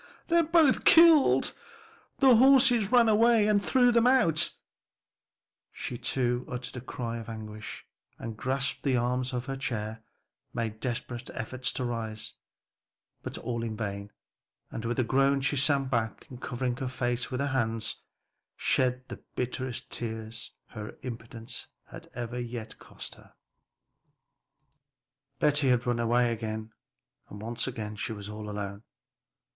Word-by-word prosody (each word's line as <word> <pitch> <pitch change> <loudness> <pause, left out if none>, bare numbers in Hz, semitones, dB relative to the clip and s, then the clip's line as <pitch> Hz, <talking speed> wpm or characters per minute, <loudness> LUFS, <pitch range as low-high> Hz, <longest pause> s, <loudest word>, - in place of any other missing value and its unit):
they're 340 0 +5
both 325 -4 +4
killed; 325 -4 +7 0.6
the 265 -3 +7
horses 250 -4 +6
ran 240 -2 +6
away 225 0 +5
and 205 -1 +3
threw 250 -2 +4
'em 235 +1 +5
out," 210 - +4 1.2
she 125 - -5
too 125 0 0
uttered 125 +1 -5
a 125 - -5
cry 115 -2 -4
of 115 - -8
anguish, 110 -1 -7 0.3
and 115 -1 -6
grasping 135 +5 -1
the - - +3
arms 125 +2 0
of 125 -1 -3
her 135 0 -3
chair, 110 -4 -3 0.5
made 110 -2 -2
desperate 120 0 -4
efforts 125 +2 -2
to 130 - -3
rise; 110 -2 -4 0.9
but - - -5
all 115 -1 -3
in 110 -2 -4
vain, 100 -1 -4 0.6
and 115 - -5
with 120 +1 -1
a 130 - +3
groan 135 +3 +3
she 140 +2 0
sank 140 -1 +2
back, 115 -3 -1
and 125 0 -9
covering 125 0 -2
her 130 - -3
face 125 -1 -1
with 125 - -3
her 140 - +1
hands, 115 -5 -1 0.6
shed 125 0 +1
the - - -8
bitterest 125 0 -3
tears 115 0 -5
her 105 -1 -8
impotence 115 0 -7 0.2
had - - -12
ever 120 0 -4
yet 115 -2 -6
cost - - -9
her. - - -19 2.0
Betty 145 -2 +3
had 125 -1 +3
run 120 -1 0
away 120 +1 +3
again, 110 -1 -5 0.6
and 110 0 -4
she 110 - -2
was 105 -1 -7
all 105 0 -6
alone. 100 -1 -5
125 Hz, 140 wpm, -29 LUFS, 115-135 Hz, 2.0 s, killed